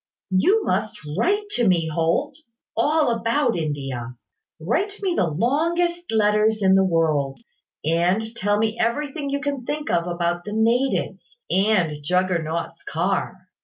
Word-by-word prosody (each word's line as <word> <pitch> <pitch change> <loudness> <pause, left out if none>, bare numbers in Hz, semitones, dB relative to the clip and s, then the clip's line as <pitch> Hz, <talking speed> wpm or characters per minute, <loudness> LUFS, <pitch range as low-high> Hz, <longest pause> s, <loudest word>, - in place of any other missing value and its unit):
You 380 - +3
must 210 +3 -1 0.2
write 410 - +1
to 240 - +1
me, 170 -3 +2
Holt, 160 +1 0 0.4
all 295 +2 +2
about 230 +3 +1
India. 135 -6 -4 0.4
Write 360 - -1
me 375 -2 +1
the 180 - +1
longest 335 - 0
letters 215 0 +2
in 190 0 +5
the 190 0 +5
world; 155 -6 +1 0.5
and 180 +8 +1
tell 205 -1 +1
me 220 +1 -1
everything 280 +4 -1
you 280 0 -2
can 280 -3 -3
think 295 +4 -3
of 170 0 +1
about 175 0 -1
the 210 - -6
natives, 245 - 0
and 185 -7 +2
Juggernaut's 170 -1 -1
Car." 185 +2 -2
210 Hz, 135 wpm, -23 LUFS, 170-270 Hz, 0.5 s, in